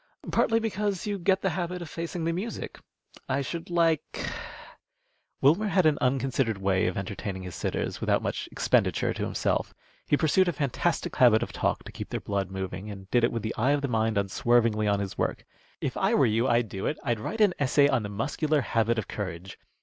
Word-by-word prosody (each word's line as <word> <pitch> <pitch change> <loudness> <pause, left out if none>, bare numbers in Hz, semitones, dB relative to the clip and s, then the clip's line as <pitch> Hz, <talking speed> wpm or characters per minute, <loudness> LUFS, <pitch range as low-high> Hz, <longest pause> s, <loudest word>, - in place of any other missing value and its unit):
Partly 225 0 +3
because 210 -3 -2
you 205 -1 -2
get 190 +2 +2
the 190 - +2
habit 180 +1 -3
of 175 - -7
facing 165 +2 -4
the 165 +1 0
music. 200 +7 -5 0.5
I 135 +1 +1
should 165 +5 -5
like 165 -3 +1 0.6
" - - -47
Wilmer 170 +10 +4
had 190 -3 +3
an 155 -2 +3
unconsidered 130 -3 +1
way 95 -1 +1
of 90 - -2
entertaining 95 -1 -4
his 90 -1 -7
sitters, - - -3
without - - +1
much - - -3
expenditure - - +1
to - - -4
himself; - - -1 0.3
he 145 - +3
pursued 175 +5 +3
a 175 - +1
fantastic 145 +4 -1
habit 120 -3 +6
of - - -5
talk - - -1
to - - -10
keep - - -7
their - - -2
blood 100 -2 -2
moving, 95 +1 -5
and 95 -1 -9
did 120 -1 +3
it 120 - +3
with 115 - -3
the 110 - -2
eye 130 +6 +2
of 145 - 0
the - - +1
mind 110 -3 +1
unswervingly 110 +2 +2
on 100 -1 +2
his 100 -1 -5
work. - - -1 0.4
"If - - -2
I - - +2
were - - +5
you, 115 +3 +2
I'd 120 -2 +2
do 95 -1 -4
it. 150 - -1
I'd 120 -4 0
write 220 - -4
an 205 -4 +5
essay 140 +1 +4
on 130 -4 +2
the 105 - -5
muscular 145 +8 0
habit 115 -1 +1
of 110 - -2
courage. 95 -2 -6
130 Hz, 210 wpm, -27 LUFS, 105-170 Hz, 0.6 s, habit